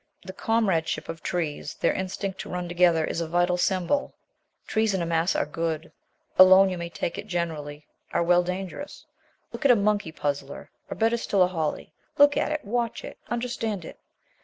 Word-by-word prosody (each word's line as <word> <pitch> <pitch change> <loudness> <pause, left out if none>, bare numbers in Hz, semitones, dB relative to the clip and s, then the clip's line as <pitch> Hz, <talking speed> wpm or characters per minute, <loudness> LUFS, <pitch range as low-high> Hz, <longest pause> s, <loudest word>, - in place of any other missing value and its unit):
The 190 - -7
comradeship 190 -8 0
of 165 -1 -6
trees, 165 -5 -3
their - - +1
instinct 190 +1 -4
to - - -6
run 180 0 -3
together, 175 -2 +3
is 170 - -3
a 165 - -2
vital 175 +2 +2
symbol. 185 +9 0 0.5
Trees 220 -2 +1
in 185 - -1
a - - -1
mass 165 +2 +1
are - - +1
good; 160 +1 -3 0.5
alone, 190 +1 +8
you 180 - -3
may 170 0 -4
take 170 - -4
it - - -8
generally, 155 -5 -4 0.3
are 170 - +1
well, 175 +1 +4
dangerous. 185 - -6 0.5
Look - - -6
at 280 - +4
a 245 - +8
monkey 205 -5 +1
puzzler, 145 -2 -4 0.2
or - - -4
better 230 +1 +2
still, 200 -4 +2
a - - +3
holly. 160 -3 -3 0.2
Look 290 0 +6
at - - 0
it, 305 -5 -3
watch 235 +2 -2
it, - - -10
understand 230 -6 -3
it. - - -11
180 Hz, 185 wpm, -26 LUFS, 165-210 Hz, 0.5 s, alone